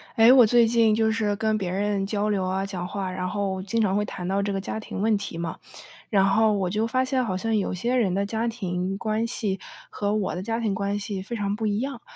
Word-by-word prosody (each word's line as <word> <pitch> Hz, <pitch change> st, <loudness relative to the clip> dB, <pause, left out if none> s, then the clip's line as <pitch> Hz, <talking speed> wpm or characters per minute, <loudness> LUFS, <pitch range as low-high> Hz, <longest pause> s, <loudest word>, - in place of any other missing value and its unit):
哎， 230 Hz, +2 st, +7 dB
我 250 Hz, -4 st, +7 dB
最 240 Hz, +1 st, +5 dB
近 225 Hz, -2 st, +4 dB
就 220 Hz, 0 st, +2 dB
是 215 Hz, -2 st, 0 dB
跟 215 Hz, 0 st, 0 dB
别 185 Hz, -, -2 dB
人 200 Hz, +1 st, 0 dB
交 205 Hz, +1 st, -1 dB
流 200 Hz, -3 st, 0 dB
啊， 190 Hz, +1 st, -1 dB
讲 180 Hz, -3 st, -4 dB
话， 190 Hz, -1 st, -3 dB
然 185 Hz, 0 st, -3 dB
后 195 Hz, -2 st, -2 dB
经 200 Hz, +4 st, -2 dB
常 195 Hz, -2 st, +2 dB
会 210 Hz, -, +2 dB
谈 180 Hz, -3 st, -6 dB
到 195 Hz, +1 st, +1 dB
这 200 Hz, 0 st, -1 dB
个 195 Hz, -, -1 dB
家 195 Hz, +3 st, -4 dB
庭 215 Hz, -, -7 dB
问 220 Hz, +1 st, +3 dB
题 200 Hz, -4 st, -4 dB
嘛。 165 Hz, -1 st, -4 dB, 0.5 s
然 200 Hz, -3 st, +4 dB
后 220 Hz, +2 st, +4 dB
我 195 Hz, -3 st, 0 dB
就 215 Hz, +5 st, 0 dB
发 255 Hz, +3 st, +1 dB
现 260 Hz, -1 st, 0 dB
好 200 Hz, -5 st, -2 dB
像 225 Hz, +4 st, 0 dB
有 200 Hz, -, 0 dB
些 235 Hz, +8 st, -1 dB
人 210 Hz, -7 st, +2 dB
的 200 Hz, +1 st, 0 dB
家 225 Hz, +2 st, -2 dB
庭 190 Hz, -4 st, -2 dB
关 215 Hz, +2 st, -1 dB
系 205 Hz, -4 st, -2 dB, 0.3 s
和 205 Hz, 0 st, -1 dB
我 210 Hz, -3 st, -1 dB
的 180 Hz, -, -4 dB
家 225 Hz, +3 st, -2 dB
庭 215 Hz, -4 st, 0 dB
关 200 Hz, +1 st, -1 dB
系 200 Hz, -2 st, -4 dB
非 220 Hz, +5 st, -6 dB
常 205 Hz, -2 st, -1 dB
不 220 Hz, 0 st, -2 dB
一 205 Hz, -1 st, 0 dB
样。 265 Hz, -2 st, -4 dB
205 Hz, 275 characters per minute, -25 LUFS, 195-225 Hz, 0.5 s, 哎